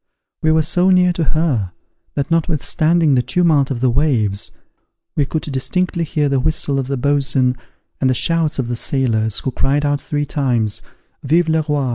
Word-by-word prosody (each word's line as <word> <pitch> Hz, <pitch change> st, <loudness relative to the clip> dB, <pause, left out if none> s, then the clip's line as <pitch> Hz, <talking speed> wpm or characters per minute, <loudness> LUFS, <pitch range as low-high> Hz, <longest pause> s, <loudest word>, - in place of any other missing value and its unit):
We 155 Hz, -, +2 dB
were 160 Hz, 0 st, +3 dB
so 180 Hz, +4 st, +2 dB
near 180 Hz, -1 st, +4 dB
to 170 Hz, -, -1 dB
her, 135 Hz, -, 0 dB, 0.4 s
that 140 Hz, +2 st, -2 dB
notwithstanding 165 Hz, 0 st, +1 dB
the 125 Hz, -, +3 dB
tumult 155 Hz, -2 st, +2 dB
of 125 Hz, -4 st, -3 dB
the 130 Hz, -, +3 dB
waves, 115 Hz, -8 st, 0 dB, 0.6 s
we 145 Hz, -3 st, +1 dB
could 155 Hz, -, -3 dB
distinctly 170 Hz, +5 st, -1 dB
hear 150 Hz, -1 st, 0 dB
the 140 Hz, -1 st, +1 dB
whistle 145 Hz, -1 st, 0 dB
of 130 Hz, -, -3 dB
the 135 Hz, 0 st, -2 dB
boatswain, 135 Hz, -1 st, +1 dB, 0.4 s
and 130 Hz, -, +2 dB
the 130 Hz, -, +1 dB
shouts 165 Hz, +3 st, 0 dB
of 130 Hz, -3 st, -2 dB
the 120 Hz, -, -2 dB
sailors, 115 Hz, -4 st, 0 dB
who 130 Hz, -, -2 dB
cried 145 Hz, +4 st, 0 dB
out 145 Hz, -1 st, 0 dB
three 145 Hz, 0 st, -2 dB
times, 120 Hz, -8 st, -1 dB, 0.4 s
VIVE 165 Hz, +5 st, +2 dB
LE 160 Hz, 0 st, +2 dB
ROI! 140 Hz, -3 st, 0 dB
145 Hz, 180 wpm, -18 LUFS, 130-160 Hz, 0.6 s, near